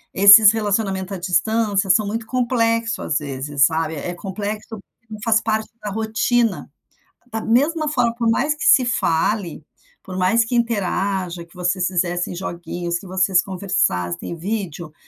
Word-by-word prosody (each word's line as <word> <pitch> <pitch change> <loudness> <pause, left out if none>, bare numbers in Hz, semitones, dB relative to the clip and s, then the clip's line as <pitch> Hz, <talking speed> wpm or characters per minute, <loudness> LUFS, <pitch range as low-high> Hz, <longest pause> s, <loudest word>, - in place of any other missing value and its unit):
Esses 200 +2 +9
relacionamento 205 -3 -2
à - - -4
distância 195 +3 0
são 210 +3 +4
muito 225 +2 -4
complexos, 230 -2 0
às 150 - -1
vezes 140 -1 0
sabe, 160 +1 -1
é 175 +4 -5
complexo, 205 +4 -6 0.3
não 215 -1 -8
faz 225 -1 +3
parte 220 0 -2
da 210 - -3
rotina, 220 +1 0 0.6
da 225 - -3
mesma 300 +8 +1
forma, 245 -5 +1
por 235 -1 0
mais 275 +6 +1
que 300 - -5
se 255 - +6
fale, 175 -6 -1 0.4
por 185 -1 -7
mais 195 +5 +2
que 245 - -3
interaja, 195 -6 -1
que 170 - -23
vocês 180 0 0
fizessem 175 -1 -2
joguinhos 175 -1 -4
que 195 - -12
vocês 185 0 +2
conversassem 175 - -2
em - - -4
vídeo, 175 -4 -5
200 Hz, 150 wpm, -20 LUFS, 175-225 Hz, 0.6 s, Esses